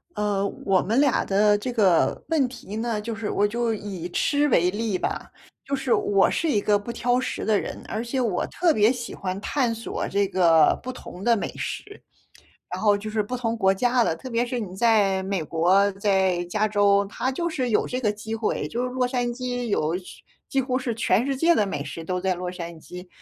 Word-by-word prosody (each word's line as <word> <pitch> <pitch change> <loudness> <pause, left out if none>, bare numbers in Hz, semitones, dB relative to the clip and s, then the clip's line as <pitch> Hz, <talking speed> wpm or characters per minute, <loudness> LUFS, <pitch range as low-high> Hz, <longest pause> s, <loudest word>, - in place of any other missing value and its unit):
呃， 205 -1 0 0.2
我 190 -2 +3
们 225 +7 +1
俩 280 -3 +3
的 205 +1 +3
这 250 +5 -4
个 195 -8 +2
问 305 -5 +2
题 230 -5 -9
呢， 225 -1 -1
就 230 +2 -4
是 220 -1 -4
我 205 - +2
就 235 +1 -1
以 195 -5 -6
吃 290 +10 +1
为 180 -7 +3
例 210 -1 -1
吧。 - - -4 0.3
就 280 - -1
是 265 -2 0
我 195 -1 +3
是 330 - 0
一 220 - +2
个 205 0 +2
不 205 +4 -6
挑 245 +1 +1
食 260 - -3
的 215 -2 +3
人， - - -6
而 220 - -3
且 245 +3 -2
我 220 -8 0
特 340 -2 +2
别 215 -1 +4
喜 245 -2 -5
欢 185 0 -4
探 245 +2 0
索 230 0 -4
这 200 0 +1
个 170 -5 +4
不 255 - -5
同 190 -6 -10
的 235 0 +3
美 - - -2
食， 410 0 -6 0.7
然 - - -4
后 205 -1 +4
就 215 +2 -6
是 215 0 0
不 250 +5 -4
同 230 -2 -1
国 195 -4 +3
家 245 +4 +2
的。 165 - +1
特 210 +11 -9
别 235 0 +1
是 245 0 -3
你 190 -5 -6
在 200 -3 +3
美 190 -2 -2
国， 175 +6 +3
在 190 -3 +1
加 210 +5 0
州， 200 -1 +3
它 260 +5 -2
就 340 +6 -2
是 260 -6 -2
有 220 - +2
这 255 +1 -3
个 210 -4 +2
机 220 +1 -6
会， 225 -1 -1
就 240 +2 -3
是 250 - -2
洛 250 0 0
杉 245 -1 -1
矶 245 0 -3
有 170 -5 0
去 180 - -12 0.3
几 270 - +1
乎 255 0 -1
是 255 -2 -2
全 220 0 +1
世 275 - 0
界 335 +4 +4
的 210 - +2
美 150 -7 -3
食 150 +3 -6
都 180 +2 -2
在 185 0 0
洛 180 0 -4
杉 170 -2 -7
矶。 180 +3 -10
215 Hz, 245 characters per minute, -24 LUFS, 190-245 Hz, 0.7 s, 别